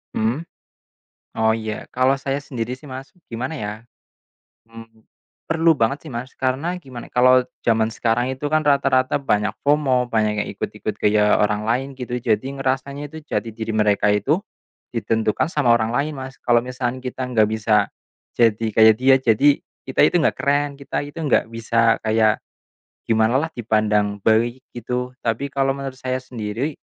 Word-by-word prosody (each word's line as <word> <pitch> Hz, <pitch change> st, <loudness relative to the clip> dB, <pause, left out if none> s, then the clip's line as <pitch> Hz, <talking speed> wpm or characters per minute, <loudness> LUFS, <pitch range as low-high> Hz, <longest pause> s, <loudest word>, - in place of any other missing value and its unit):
Mhm? 120 Hz, +10 st, -1 dB, 0.9 s
Oh 110 Hz, 0 st, +3 dB
iya, 110 Hz, -1 st, -5 dB
kalau 130 Hz, +2 st, +3 dB
saya 135 Hz, +1 st, -2 dB
sendiri 125 Hz, -3 st, -4 dB
sih 140 Hz, +2 st, -14 dB
Mas 135 Hz, +1 st, -8 dB, 0.2 s
gimana 125 Hz, +6 st, -4 dB
ya, 105 Hz, -7 st, -4 dB, 1.0 s
hmm, 115 Hz, -1 st, -14 dB, 0.5 s
perlu 165 Hz, 0 st, +4 dB
banget 135 Hz, +5 st, 0 dB
sih -, -, -8 dB
Mas 125 Hz, +3 st, -5 dB
karena 140 Hz, +8 st, -1 dB
gimana 130 Hz, -6 st, -10 dB
kalau 130 Hz, +1 st, +5 dB, 0.2 s
zaman 110 Hz, -1 st, +2 dB
sekarang 120 Hz, +3 st, 0 dB
itu 130 Hz, +3 st, -6 dB
kan 155 Hz, +1 st, +2 dB
rata-rata 135 Hz, -2 st, +2 dB
banyak 105 Hz, -6 st, 0 dB
FOMO 135 Hz, -4 st, +2 dB
banyak 105 Hz, -2 st, 0 dB
yang -, -, -7 dB
ikut-ikut -, -, -4 dB
gaya 105 Hz, 0 st, +4 dB
orang 105 Hz, +1 st, 0 dB
lain 130 Hz, +4 st, 0 dB
gitu, 125 Hz, -1 st, -4 dB
jadi 110 Hz, +1 st, +1 dB, 0.2 s
ngerasanya 140 Hz, +2 st, -2 dB
itu 160 Hz, -, -10 dB
jati 115 Hz, -, -2 dB
diri 110 Hz, 0 st, -5 dB
mereka 105 Hz, -1 st, +2 dB
itu 120 Hz, -, +1 dB, 0.5 s
ditentukan 115 Hz, +4 st, 0 dB
sama 140 Hz, -8 st, +3 dB
orang 110 Hz, -1 st, +1 dB
lain 140 Hz, +5 st, -1 dB
Mas. 130 Hz, -1 st, -8 dB
Kalau 120 Hz, -1 st, +3 dB
misalkan 125 Hz, 0 st, -4 dB
kita 130 Hz, 0 st, -4 dB
nggak 110 Hz, -4 st, +2 dB
bisa 110 Hz, -1 st, +2 dB, 0.5 s
jadi 115 Hz, -1 st, +3 dB
kayak 110 Hz, 0 st, +6 dB
dia, 130 Hz, +2 st, +5 dB
jadi 130 Hz, +2 st, +3 dB, 0.3 s
kita 130 Hz, -, 0 dB
itu -, -, -2 dB
nggak -, -, +1 dB
keren, 145 Hz, +1 st, +1 dB
kita 140 Hz, -, -3 dB
itu 145 Hz, +3 st, -11 dB
nggak 150 Hz, -7 st, +1 dB
bisa 115 Hz, 0 st, +2 dB
kayak 110 Hz, -1 st, +3 dB, 0.7 s
gimana 110 Hz, +2 st, +3 dB
lah, 160 Hz, +3 st, -2 dB
dipandang 105 Hz, -3 st, +1 dB
baik 115 Hz, +4 st, +2 dB, 0.2 s
gitu. 125 Hz, +1 st, -4 dB
Tapi 115 Hz, +4 st, -1 dB
kalau 135 Hz, -1 st, 0 dB
menurut 135 Hz, -1 st, -6 dB
saya 130 Hz, 0 st, -2 dB
sendiri, 125 Hz, +2 st, -4 dB
125 Hz, 160 wpm, -21 LUFS, 110-135 Hz, 1.0 s, kayak